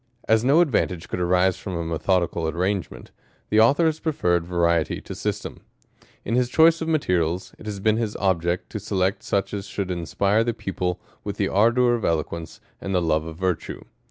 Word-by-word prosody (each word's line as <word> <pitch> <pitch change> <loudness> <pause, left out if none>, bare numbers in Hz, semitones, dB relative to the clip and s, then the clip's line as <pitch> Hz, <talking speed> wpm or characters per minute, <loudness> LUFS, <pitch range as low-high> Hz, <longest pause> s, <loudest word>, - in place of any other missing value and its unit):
As 110 0 +3
no 140 +7 +5
advantage 100 - 0
could - - -3
arise 90 +1 +2
from 95 -3 -5
a 85 -1 -3
methodical 85 +1 0
ar - - 0
rangement, 95 +2 -3 0.4
the 105 - +4
Author 140 +9 +5
has 160 -1 +1
preferred 90 - 0
variety 85 -2 +1
to - - -8
sys - - -3
yern. - - -8 0.7
In - - -2
his 125 0 +2
choice 165 +4 +5
of 160 - -2
materials, 90 - 0
it 110 - -10
has 105 -2 -4
been 110 +2 +2
his 110 -3 -2
object 90 -2 0
Jo 105 - -4
select 95 -1 -1
such 100 +1 -1
as 100 -1 -4
should 95 -2 -3
inspire 100 +5 +1
the 120 -1 -2
pupil 90 -2 -3 0.2
zoith - - -4
the - - 0
ardour 120 +4 +3
^.of 115 - -8
eloquence, 80 0 -2 0.2
and 95 -1 -3
the - - +4
love 80 -2 0
of 80 -1 -8
virtue. 90 -2 -2
95 Hz, 195 wpm, -24 LUFS, 85-110 Hz, 0.7 s, no